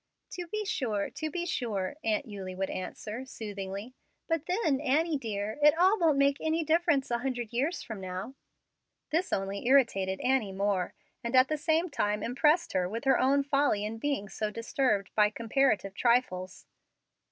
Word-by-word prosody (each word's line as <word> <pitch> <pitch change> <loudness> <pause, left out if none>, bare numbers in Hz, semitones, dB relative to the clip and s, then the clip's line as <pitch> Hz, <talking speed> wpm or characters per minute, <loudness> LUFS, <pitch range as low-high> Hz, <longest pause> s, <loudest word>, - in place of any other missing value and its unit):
"To 355 -1 -6
be 425 +4 -3
sure 245 - -1
to 315 - -4
be 345 +3 -3
sure," 220 - -2
Aunt 220 +3 0
Eulie 195 -4 -7
would 190 +1 -2
answer, 210 +5 -5
soothingly; 205 -2 -6 0.3
"but 330 -1 -1
then, 355 -8 +1
Annie 310 +3 +2
dear, 215 +1 -4
it 300 +2 +6
all 380 +5 +4
won't 320 -5 +3
make 280 0 +3
any 320 +1 0
difference 315 -4 +2
a 235 - +1
hundred 245 -3 -3
years 285 +9 -1
from 220 -4 -7
now." 185 +6 -5 0.8
This 340 +4 0
only 195 +3 -2
irritated 195 -8 +3
Annie 250 -7 +1
more, 195 -2 -1 0.3
and 235 +2 -1
at 255 +1 +6
the 310 - +1
same 320 +2 +1
time 210 -6 0
impressed 295 +8 +2
her 180 -1 +1
with 230 +5 -4
her 270 -2 +4
own 280 +2 +3
folly 275 -7 +1
in 225 +1 -5
being 275 -7 -1
so 215 +1 -3
disturbed 230 -2 0
by 210 -1 +4
comparative 225 -2 +1
trifles. 195 -6 0
250 Hz, 170 wpm, -30 LUFS, 205-295 Hz, 0.8 s, it